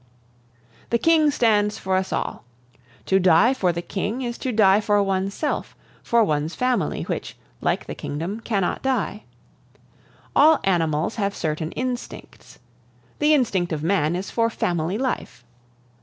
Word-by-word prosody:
"The 235 - +2
King 315 +4 +4
stands 215 -6 +2
for 190 0 -1
us 190 0 -1
all. - - -3 0.6
To 190 - +3
die 185 +7 +5
for 190 -9 +1
the 170 0 -5
King 215 +8 -3
is 240 -1 -4
to 260 - -2
die 210 -2 +4
for 205 -1 +2
oneself, 195 +8 -2 0.3
for 235 -1 +3
one's 155 -2 -1
family, 250 -4 0
which, - - -5 0.2
like - - 0
the - - -6
kingdom, 170 +9 -5
cannot 205 -5 -1
die. 240 -5 -2 1.1
All 310 +1 +6
animals 165 0 0
have 200 -2 -1
certain 155 +1 -3
instincts; 250 -1 -6 0.6
the 300 +1 +4
instinct 195 - 0
of 155 -2 -3
man 170 -2 +1
is 185 +2 -5
for 230 -1 +1
family 175 -3 -1
life. 250 - -4
200 Hz, 140 wpm, -23 LUFS, 175-240 Hz, 1.1 s, All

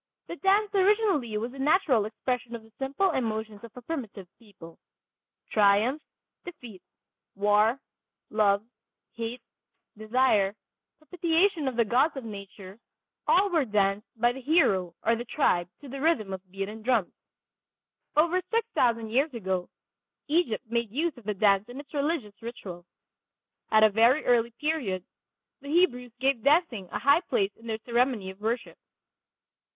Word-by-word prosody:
The - - -6
dance 400 +2 +2
originally 390 - +2
was 230 +3 -3
the 270 - -11
natural 285 - +3
expression 240 +2 -3
of 230 - -9
the 225 - -20
simple 275 +8 0
emotions 220 -5 -3
of 230 - -10
a 250 - -10
primitive 230 - -6
people. 195 -7 -15 0.7
Triumph, 215 +7 +3 0.4
defeat, 245 - -11 0.5
war, 210 +5 +3 0.5
love, 205 -1 +2 0.5
hate, 230 +1 -5 0.5
desire, 215 -2 +2 0.4
propitiation 335 0 0
of 260 - -2
the 235 -1 +3
gods 260 +8 +2
of 265 - -5
nature, 200 -2 -10 0.5
all 390 +1 +4
were 325 -4 +3
danced 205 -2 0
by 240 +1 +4
the 265 +2 -8
hero 200 - +2
or 230 +1 +3
the 235 - -5
tribe 180 - +1
to 285 - -10
the 270 +1 -7
rhythm 230 -12 +1
of 190 0 -8
beaten 195 +3 -5
drums. 225 -5 +1 1.0
Over 340 +4 +3
six 460 0 0
thousand 230 -3 +1
years 275 +6 +2
ago 190 -4 -2 0.6
Egypt 290 -7 0
made 235 -1 -1
use 310 +8 -1
of 240 -5 -16
the 210 -1 -2
dance 200 +2 +3
in 250 +3 -8
its 285 +1 -12
religious 285 -7 -1
ritual. 185 -7 -8 0.8
At 215 0 +5
a 215 - +7
very 235 +8 +4
early 235 -1 +3
period 270 - -1 0.6
the 280 - -9
Hebrews 250 -8 +1
gave 265 -2 +1
dancing 280 - +2
a - - -2
high 285 +4 +4
place 205 - 0
in 230 - -15
their 220 -1 -2
ceremony 235 -5 0
of 190 +2 -18
worship. 230 +2 -3
235 Hz, 150 wpm, -27 LUFS, 210-290 Hz, 1.0 s, a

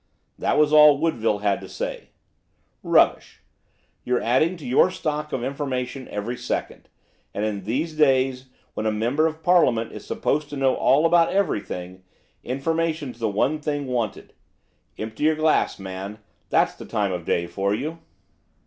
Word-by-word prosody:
That - - +1
was 150 0 +3
all 150 -1 +8
Woodville 115 -10 0
had 100 -1 +1
to - - -10
say. - - -5 0.7
'Rubbish! - - +2 0.6
You're 125 0 +1
adding 155 +10 +1
to 155 - -11
your 130 +8 +4
stock 150 -4 -3
of 120 - -2
information 135 -1 -3
every 110 +4 -4
second, - - -4 0.5
and, 105 - -1
in 100 -3 -3
these 150 +9 -2
days, 135 -3 +2 0.3
when 110 - -2
a - - +2
member 120 +9 +1
of 160 0 -6
Parliament 125 -10 +3
is - - -9
supposed 150 0 -1
to 145 - -6
know 135 -1 +2
all 150 +4 +3
about 165 0 +4
everything, 95 - -2 0.4
information's 155 0 -2
the 115 -2 0
one 135 +10 0
thing 145 -1 -2
wanted. 120 -4 -3 0.6
Empty 110 +5 -5
your 155 0 +4
glass, 155 0 +1
man, 95 +2 -7 0.3
that's - - +2
the - - -11
time 100 -2 -1
of 90 -1 -4
day 85 +1 0
for 100 +3 -2
you! 155 +8 -5
130 Hz, 160 wpm, -23 LUFS, 110-155 Hz, 0.7 s, all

